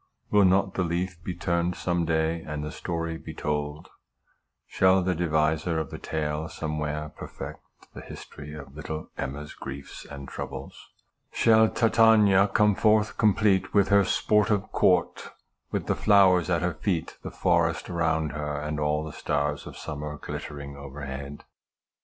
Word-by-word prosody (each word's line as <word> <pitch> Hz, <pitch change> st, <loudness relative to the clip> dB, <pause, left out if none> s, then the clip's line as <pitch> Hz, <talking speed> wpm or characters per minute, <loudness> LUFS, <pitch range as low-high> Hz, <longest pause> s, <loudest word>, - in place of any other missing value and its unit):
Will 105 Hz, -1 st, +6 dB
not 95 Hz, +1 st, +3 dB
the -, -, -1 dB
leaf 85 Hz, 0 st, -3 dB
be 90 Hz, -, -4 dB
turned 85 Hz, 0 st, 0 dB
some 85 Hz, -1 st, -1 dB
day, 80 Hz, +1 st, 0 dB
and 75 Hz, -1 st, -5 dB
the 75 Hz, -, -4 dB
story 85 Hz, -1 st, -4 dB
be 80 Hz, -, -9 dB
told? 75 Hz, 0 st, -3 dB, 0.8 s
Shall 95 Hz, 0 st, +3 dB
the 90 Hz, 0 st, +1 dB
deviser 80 Hz, 0 st, +1 dB
of 80 Hz, -, -4 dB
the -, -, -6 dB
tale 75 Hz, 0 st, -3 dB
somewhere 75 Hz, 0 st, -3 dB
perfect -, -, -8 dB, 0.3 s
the -, -, -8 dB
history 75 Hz, +1 st, -10 dB
of 70 Hz, -2 st, -10 dB
little 80 Hz, 0 st, -6 dB
EMMA'S 75 Hz, +2 st, -5 dB
griefs 70 Hz, 0 st, -8 dB
and 70 Hz, -1 st, -9 dB
troubles? -, -, -8 dB, 0.4 s
Shall 110 Hz, -1 st, +5 dB
TITANIA 110 Hz, -4 st, +5 dB
come 105 Hz, +1 st, +3 dB
forth 105 Hz, +1 st, +2 dB
complete 105 Hz, -3 st, +3 dB
with 100 Hz, -1 st, +4 dB
her 100 Hz, 0 st, +5 dB
sportive 105 Hz, +1 st, +1 dB
court, 90 Hz, -2 st, +2 dB, 0.4 s
with -, -, -2 dB
the -, -, +1 dB
flowers 95 Hz, -4 st, +4 dB
at 85 Hz, -1 st, +1 dB
her 90 Hz, -1 st, 0 dB
feet, 85 Hz, 0 st, -2 dB
the -, -, -6 dB
forest 85 Hz, -1 st, +1 dB
around 80 Hz, -3 st, 0 dB
her, 75 Hz, -1 st, -3 dB
and 75 Hz, 0 st, -3 dB
all 75 Hz, +1 st, 0 dB
the 80 Hz, -, -7 dB
stars 75 Hz, 0 st, -2 dB
of -, -, -9 dB
summer 75 Hz, 0 st, -6 dB
glittering 70 Hz, -1 st, -7 dB
overhead 70 Hz, 0 st, -7 dB
80 Hz, 150 wpm, -27 LUFS, 75-95 Hz, 0.8 s, Will